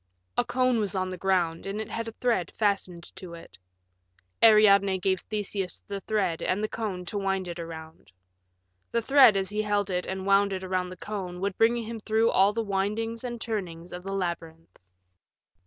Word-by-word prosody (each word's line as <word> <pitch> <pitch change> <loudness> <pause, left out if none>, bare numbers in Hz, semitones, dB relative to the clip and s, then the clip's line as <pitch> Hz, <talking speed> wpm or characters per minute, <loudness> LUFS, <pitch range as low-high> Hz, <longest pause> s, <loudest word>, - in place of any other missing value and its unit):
A - - +3
cone 250 -1 +1
was 205 -2 -2
on 185 0 -1
the - - -4
ground 175 -2 0
and 200 +2 -3
it 220 - -5
had 230 0 -3
a - - -4
thread 225 -9 0
fastened 190 -5 -1
to 175 -2 -8
it. 100 - -14 0.8
Ariadne 200 -3 +6
gave 190 0 0
Theseus 205 -3 -4
the 200 -1 -4
thread 195 -5 -1
and 195 +3 0
the - - +1
cone 200 -6 -4
to 205 +4 -3
wind 195 -1 -1
it 175 0 -6
around. 160 - -9 0.8
The 235 - 0
thread 265 -5 +7
as 190 -1 -1
he 210 +1 -1
held 205 -2 0
it 180 0 -1
and 190 0 -4
wound 200 0 +4
it 190 0 -4
around 185 -1 -1
the 185 - -9
cone 185 -3 -5
would 200 -1 -1
bring 230 +1 +3
him 230 -1 -5
through 220 +2 +2
all 195 +2 +5
the 225 +2 -2
windings 210 +3 -2
and 240 -1 -5
turnings 180 -7 -5
of 180 - -6
the 195 +2 -6
labyrinth. 170 -3 -5
195 Hz, 190 wpm, -27 LUFS, 180-215 Hz, 0.8 s, thread